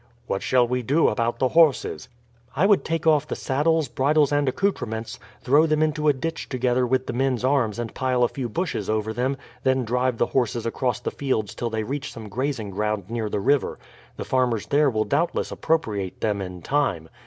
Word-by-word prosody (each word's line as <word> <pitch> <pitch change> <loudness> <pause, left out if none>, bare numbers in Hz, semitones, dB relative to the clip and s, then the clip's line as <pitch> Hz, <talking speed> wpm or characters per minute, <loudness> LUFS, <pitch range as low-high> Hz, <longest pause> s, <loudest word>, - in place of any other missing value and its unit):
"What 100 - -2
shall 125 -2 +3
we 125 +1 -1
do 140 +7 +3
about 115 +2 -1
the 130 +1 +1
horses?" 150 -5 +2 0.5
"I 160 +8 +3
would 205 -1 +4
take 165 -1 -2
off 150 -2 +4
the - - -3
saddles, 150 +3 +1
bridles, 145 +3 +2
and 145 -2 +2
accouterments, 115 - -2 0.2
throw 145 +5 +4
them 155 0 +2
into 155 0 0
a 145 - +6
ditch 165 +5 -4
together 125 -1 +1
with 130 +1 +1
the - - -4
men's 130 -1 0
arms 130 -6 +1
and 120 -1 -4
pile 130 -1 +1
a - - +5
few 125 -2 -5
bushes 110 - -3
over 110 0 -1
them, 130 +4 -1 0.2
then 130 -1 +1
drive 125 +1 0
the - - +2
horses 120 -2 0
across 125 +1 -1
the 125 - -3
fields 120 -7 -2
till 120 - -3
they 110 -1 -2
reach 140 +5 -4
some 110 -2 -9
grazing 125 -2 -3
ground 105 0 -2
near 115 -2 -2
the 105 - -1
river; 140 +7 +1 0.4
the - - -5
farmers 125 -5 +1
there 145 0 +3
will 110 -3 0
doubtless 160 +5 0
appropriate 105 - -1
them 105 -2 -1
in 90 -2 -7
time. 135 - 0
130 Hz, 200 wpm, -24 LUFS, 110-145 Hz, 0.5 s, a